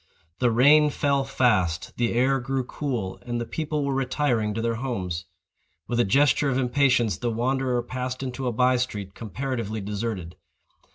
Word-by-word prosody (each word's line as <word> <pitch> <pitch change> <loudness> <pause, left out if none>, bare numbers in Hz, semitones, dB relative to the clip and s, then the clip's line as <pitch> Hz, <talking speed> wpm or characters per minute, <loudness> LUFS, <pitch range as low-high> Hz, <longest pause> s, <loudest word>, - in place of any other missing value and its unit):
The 125 - +3
rain 145 +6 +6
fell 140 -1 +1
fast; 105 -11 +1
the 120 -1 0
air 135 +3 +3
grew 135 +1 -2
cool; 120 -8 -4
and 120 -1 -3
the 120 - -3
people 150 +4 -2
were 140 - 0
retiring 130 -5 0
to - - -2
their 115 0 +1
homes. 90 -10 -3 0.6
With 120 0 -1
a - - +5
gesture 140 +5 +3
of 130 - 0
impatience, 125 -4 +2
the 120 - -2
wanderer 125 +1 0
passed 125 +1 -4
into 130 0 -4
a - - +1
by 125 +2 +3
street 105 -6 -3
comparatively 115 -1 -4
deserted. 100 -4 -4
125 Hz, 165 wpm, -25 LUFS, 115-135 Hz, 0.6 s, rain